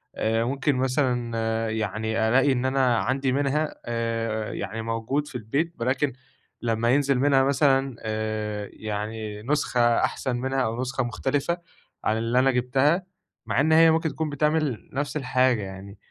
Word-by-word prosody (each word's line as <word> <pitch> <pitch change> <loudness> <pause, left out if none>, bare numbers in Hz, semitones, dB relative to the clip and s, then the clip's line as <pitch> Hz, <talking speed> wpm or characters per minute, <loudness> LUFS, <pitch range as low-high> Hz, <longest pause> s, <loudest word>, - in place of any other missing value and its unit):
آآ 110 +1 +1
ممكن 135 +3 0
مثلًا 120 -4 0
يعني 110 +1 -1
ألاقي 135 +3 +4
إن 130 0 0
أنا 130 -3 +2
عندي 130 +2 0
منها 145 +3 0
آآ 115 -2 -2
يعني 115 +1 -4
موجود 115 +6 -2
في 130 - -12
البيت، 140 +9 -1
ولكن 130 +2 0 0.5
لما 115 0 0
ينزل 140 -1 +3
منها 135 -1 +4
مثلًا 135 -2 +2
آآ 110 -1 -3
يعني 105 0 -5
نسخة 135 -1 0 0.2
أحسن 130 -2 -1
منها 130 +1 -1
أو 115 +1 -1
نسخة 135 +1 -1
مختلفة 140 +7 -1 0.5
عن 110 - +1
اللي 115 +2 +1
أنا 135 +1 +4
جِبتها، 135 +8 +2 0.4
مع 125 - 0
إن 155 +3 +3
هي 165 0 +7
ممكن 160 0 +1
تكون 155 +2 -3
بتعمل 150 -3 0
نفس 145 +2 -2
الحاجة 130 -4 +2
يعني، 95 +1 -8
125 Hz, 150 wpm, -25 LUFS, 115-140 Hz, 0.5 s, هي